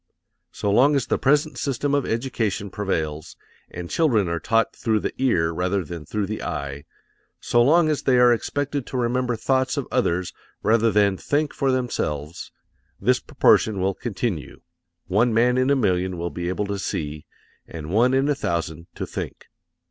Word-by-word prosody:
So 100 - -2
long 135 +8 +5
as 135 - +1
the - - 0
present 145 -1 +2
system 140 +1 -1
of 140 -2 +1
education 110 -5 -2
prevails 80 -7 -3 0.3
and 85 0 -7
children 115 - +2
are 85 0 -1
taught 115 +4 +1
through 110 -2 0
the - - -3
ear 85 -11 +2
rather 90 +3 0
than 80 -1 -8
through 105 -1 -1
the 105 +2 -5
eye, 70 0 -5 0.5
so 120 - +2
long 155 +6 +5
as 150 -2 0
they 130 -2 +3
are 125 0 +6
expected 145 +3 -2
to 130 - -4
remember 125 0 0
thoughts 130 +4 0
of 140 - -2
others 90 -8 0 0.3
rather 115 +1 +3
than 100 -2 +3
think 145 +6 -1
for 135 -1 +1
themselves, 85 - -3 0.5
this - - +2
proportion 105 -3 +3
will 95 +1 +1
continue 100 - -4 0.4
one 110 +5 +2
man 120 +2 +4
in 130 +1 +2
a 140 - +4
million 95 -6 0
will 85 0 -3
be 85 0 -4
able 100 +3 -1
to 100 0 -3
see, 75 -4 -4 0.4
and 80 -1 -7
one 120 +6 +3
in 135 +1 +2
a 145 - +3
thousand 85 - -3
to - - -4
think. - - -7
110 Hz, 175 wpm, -23 LUFS, 90-130 Hz, 0.5 s, are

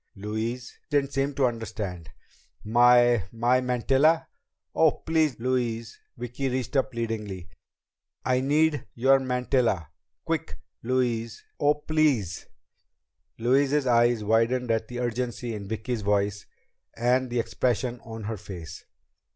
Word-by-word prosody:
Louise 110 +4 -4
didn't 140 -2 +1
seem 135 +1 0
to 135 - +3
understand. 110 - -4 0.5
"My 120 -1 +5
my 120 +2 +2
mantilla?" 135 +6 +2 0.4
"Oh, 160 - +5
please, 160 -6 0
Louise!" 115 -2 -2 0.2
Vicki 125 +3 -3
reached 130 +3 -3
up 135 -1 +2
pleadingly. 105 -6 -4 0.8
"I 130 0 +2
need 150 +2 +2
your 135 +3 +4
mantilla! 125 - 0 0.4
Quick, 165 -1 -2 0.2
Louise! 120 -2 -1
Oh, 145 +1 +4
please!" 150 - 0 0.9
Louise's 135 +4 +2
eyes 120 -2 +3
widened 115 +3 +2
at 110 0 0
the 125 0 -6
urgency 120 0 -2
in 100 -2 -6
Vicki's 110 +2 -3
voice 100 0 0 0.5
and 125 +2 +2
the 120 0 -1
expression 120 +1 -1
on 115 -1 -8
her 110 +1 -4
face. 85 -5 -9
120 Hz, 120 wpm, -26 LUFS, 110-130 Hz, 0.9 s, My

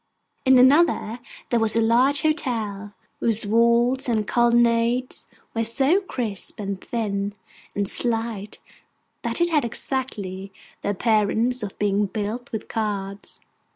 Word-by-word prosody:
In 260 0 +6
another 260 -3 +4 0.3
there 240 - +3
was 225 -1 +2
a - - +4
large 250 +6 +3
hotel, 220 -10 -2 0.2
whose 225 -2 0
walls 235 +4 +2
and 215 -3 0
colonnades 240 +1 +2 0.3
were 230 - 0
so 270 - +2
crisp, 230 - -2
and 200 -2 -4
thin, 205 -3 -2 0.4
and 200 -1 0
slight, 225 -3 -2 0.6
that - - -2
it 345 0 +2
had 300 -3 +3
exactly 210 -6 -3 0.3
the - - -2
appearance 220 +4 +1
of 205 -2 -6
being 205 0 +1
built 215 +4 -4
with 220 - -5
cards. 200 -2 -4
230 Hz, 125 wpm, -23 LUFS, 205-250 Hz, 0.6 s, In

